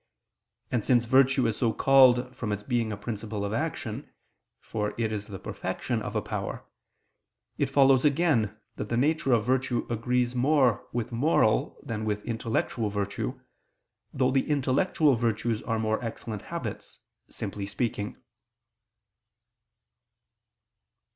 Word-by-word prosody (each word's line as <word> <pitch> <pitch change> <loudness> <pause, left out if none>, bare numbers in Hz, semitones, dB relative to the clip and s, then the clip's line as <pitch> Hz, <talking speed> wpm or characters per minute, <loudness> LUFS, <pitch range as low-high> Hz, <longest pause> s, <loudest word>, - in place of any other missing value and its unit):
And 120 -4 0
since 120 0 +3
virtue 130 +1 +4
is 115 -2 0
so 115 -3 +2
called 130 -2 +5
from 110 -3 -3
its 105 0 -3
being 120 -2 0
a 105 - -4
principle 105 -1 -4
of 100 - -3
action, 130 -2 -3 0.5
for 105 -1 -3
it 115 -2 0
is 105 -1 -4
the 100 -3 -7
perfection 115 +5 -3
of 105 - -5
a 105 - 0
power, 105 -2 -4 0.9
it - - +2
follows 135 -2 +5
again 140 - +2 0.2
that 105 - -4
the 115 - 0
nature 145 +1 +2
of 115 -3 +3
virtue 130 -1 0
agrees 125 +2 0
more 130 -2 +2
with 120 0 -3
moral 120 -3 +2
than 110 -2 -4
with 105 -1 -2
intellectual 115 -1 -1
virtue, 100 0 -3 0.7
though 130 -1 +1
the 135 +2 +1
intellectual 145 +2 +2
virtues 115 -1 0
are 115 -2 -2
more 110 +2 -1
excellent 110 -2 -5
habits, - - -6 0.3
simply 100 -1 -5
speaking. 105 0 -3
115 Hz, 135 wpm, -27 LUFS, 105-130 Hz, 0.9 s, called